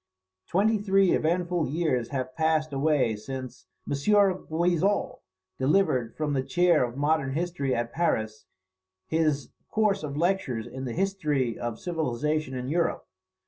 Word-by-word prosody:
Twenty 210 +4 +2
three 195 -2 +3
eventful 175 0 +1
years 135 -5 0
have 130 -2 -4
passed 155 -1 +1
away 135 -5 +2
since 125 -3 -7 0.2
M. - - -2
Guizot 180 +1 +1 0.4
delivered 130 -5 +1
from 150 -2 -1
the 135 - +1
chair 175 +2 +3
of 120 +1 -4
modern 145 -2 +1
history 165 -4 -1
at 120 0 -3
Paris 110 -10 -1 0.6
his 155 -4 0 0.2
course 210 -2 +1
of 145 -2 -5
lectures 155 - 0
on 130 0 -6
the 120 - -4
History 150 - 0
of 120 -2 -4
Civilization 155 -3 -2
in 125 0 -4
Europe. 165 +4 0
155 Hz, 135 wpm, -27 LUFS, 130-175 Hz, 0.6 s, three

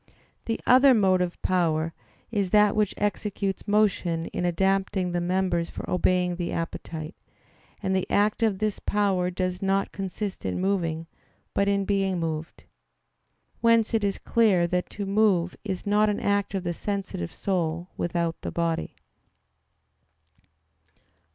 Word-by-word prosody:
The 225 - -2
other 260 +1 +7
motive 185 -4 +2
power 165 -3 +1 0.4
is 200 -4 0
that 210 +1 +4
which 210 -2 +1
executes 205 -1 -2
motion 190 -5 +1
in 180 - -1
adapting 190 +1 +1
the 175 0 -1
members 180 -1 0
for - - -7
obeying 180 -1 +1
the 175 -1 -3
appetite; 165 0 -5 0.7
and 190 -1 +1
the 190 - -1
act 210 +3 +2
of 220 -4 +2
this 215 0 -1
power 195 -3 +1
does 185 0 -2
not 195 0 +1
consist 195 +1 -5
in 95 -1 -2
moving, 170 -4 -1 0.5
but 200 - +1
in 200 -1 +1
being 195 -2 0
moved. 160 0 -4 1.0
Whence 230 -1 +3
it 220 -2 +2
is 200 -1 0
clear 205 -7 +3
that 180 +1 -1
to 205 - -5
move 195 -4 +2
is 190 -3 -4
not 210 +1 +3
an 205 - -1
act 200 0 0
of 190 - -2
the 175 -1 -2
sensitive 190 - -4
soul 175 -2 -2
without 170 -1 -2
the - - -4
body. 165 -1 -2
190 Hz, 140 wpm, -26 LUFS, 175-205 Hz, 1.0 s, other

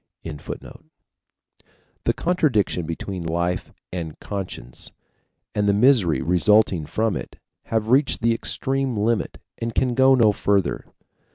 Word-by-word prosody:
] - - -56
The 75 -3 -8 1.4
contradiction 120 - +1
between 90 +3 -5
life 85 +2 -2 0.2
and 85 -4 -5
conscience 90 -12 -7 0.6
and 105 -1 +1
the 100 - +3
misery 105 - +4
resulting 90 -1 +3
from 110 +4 0
it - - -7 0.3
have 110 -1 -1
reached 135 -1 +3
the 115 0 +4
extreme 135 +1 -1
limit 110 +1 0 0.2
and 115 -1 -4
can 125 -2 +1
go 130 +2 +5
no 115 -4 +5
further. 100 -1 0
105 Hz, 120 wpm, -23 LUFS, 90-120 Hz, 1.4 s, go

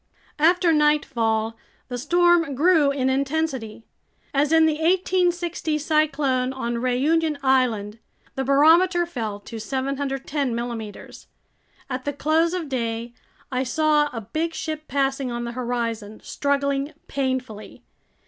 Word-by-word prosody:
After 340 +2 +4
nightfall 230 -7 +1 0.3
the 245 - -4
storm 345 0 +3
grew 315 0 +4
in 275 -2 0
intensity. 265 -4 -1 0.5
As 290 +2 +2
in 320 0 +6
the 310 -1 +1
1860 350 -2 +1
cyclone 290 -4 +1
on 240 -3 -3
Réunion 290 +6 +1
Island, 230 -5 +1 0.3
the 270 - -2
barometer 330 +6 +4
fell 225 -11 -4
to 225 +2 -8
710 270 +1 -2
millimeters. 230 -3 -6 0.6
At 255 -1 -5
the 285 - -1
close 320 +4 +1
of 345 -4 -3
day, 235 -2 -3 0.4
I 255 0 0
saw 300 +2 +2
a 230 - -5
big 320 +9 -3
ship 310 -1 -5
passing 270 -1 0
on 240 0 -3
the 235 - -4
horizon, 235 -3 -3
struggling 280 0 -1
painfully. 260 -6 -4
275 Hz, 120 wpm, -23 LUFS, 245-315 Hz, 0.6 s, in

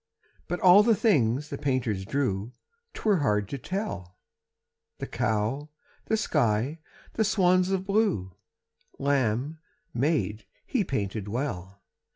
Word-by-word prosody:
But 175 +1 -2
all 185 +2 +8
the 225 +1 +4
things 145 - +2
the - - -5
painter 130 -6 0
drew 105 +1 -2 0.4
'Twere 210 -3 +2
hard 105 - +1
to 140 - -4
tell 120 - -5 0.8
The - - -4
cow, 110 +8 -1 0.4
the 220 - +1
sky, 140 - 0 0.3
the 220 - +1
swans 185 -2 +3
of 190 -1 -1
blue, 195 - 0 0.6
Lamb, 140 +2 0 0.3
maid, 125 -6 0 0.2
he 245 -6 0
painted 105 - -3
well. 100 -5 -4
140 Hz, 120 wpm, -27 LUFS, -, 0.8 s, all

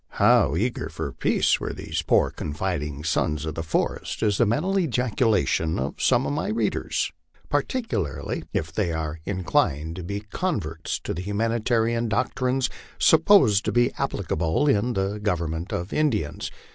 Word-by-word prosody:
How 70 - +5
eager 120 +3 -1
for 80 -2 -4
peace - - +2
were - - -4
these - - -3
poor, - - +3
confiding 75 -2 -3
sons 75 -1 0
of 80 - -3
the 80 - -4
forest 80 -1 -2
is 105 -2 +2
the 120 - +4
mental 160 - 0
ejaculation 115 - +1
of 65 +2 -3
some 125 0 +3
of - - -1
my 150 +6 -1
readers, 220 - -1 0.4
particularly 110 - -2
if 75 0 -2
they 90 -1 0
are 80 -1 -3
inclined 80 -4 0
to 90 - -5
be 100 +4 -4
converts 105 - -3
to - - -3
the 85 - -4
humanitarian 115 +3 0
doctrines 130 +3 0 0.3
supposed 160 - +5
to - - +1
be 120 +1 +3
applicable 85 - 0
in 120 -2 +2
the 100 +1 -1
government 85 -4 -2
of 90 +3 -3
Indians. 110 - 0
100 Hz, 150 wpm, -25 LUFS, 80-120 Hz, 0.4 s, How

